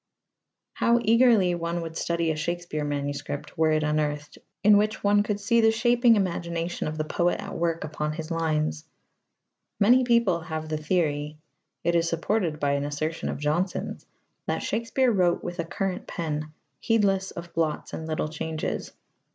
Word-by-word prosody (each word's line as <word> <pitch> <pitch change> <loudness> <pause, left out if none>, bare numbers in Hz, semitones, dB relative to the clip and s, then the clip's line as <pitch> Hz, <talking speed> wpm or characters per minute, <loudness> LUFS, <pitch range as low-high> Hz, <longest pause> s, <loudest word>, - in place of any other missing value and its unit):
How 235 0 +3
eagerly 225 -5 +5
one 170 0 -2
would 165 0 -7
study 170 0 0
a - - -2
Shakespeare 170 -1 -3
manuscript, 145 0 -4
were 160 0 +3
it 155 0 +2
unearthed, 150 -1 -1 0.2
in 210 0 +7
which 210 +1 +1
one 205 0 +4
could 205 0 -2
see 230 +3 +3
the 225 - +5
shaping 240 +1 +4
imagination 170 -4 -2
of 155 0 -4
the 155 - 0
poet 175 +3 0
at 200 -1 -6
work 165 -1 -1
upon 150 0 -3
his 160 +1 -6
lines! 155 -1 0 1.0
Many 245 +5 +5
people 235 -8 +3
have 160 -1 -5
the 155 - -1
theory 150 -2 -1 0.5
it 170 - +2
is 170 0 +2
supported 165 -1 -1
by 145 -1 +1
an 140 0 0
assertion 155 +3 -3
of - - -3
Jonson's 155 +6 -2 0.4
that - - -1
Shakespeare 235 +2 +1
wrote 180 -5 +2
with 175 0 -5
a 170 - -1
current 190 +2 -3
pen, 155 -2 -3 0.3
heedless 195 -4 +2
of 170 0 -9
blots 160 -2 -1
and 160 - -5
little 155 -1 -1
changes. 155 0 -4
170 Hz, 165 wpm, -26 LUFS, 155-200 Hz, 1.0 s, in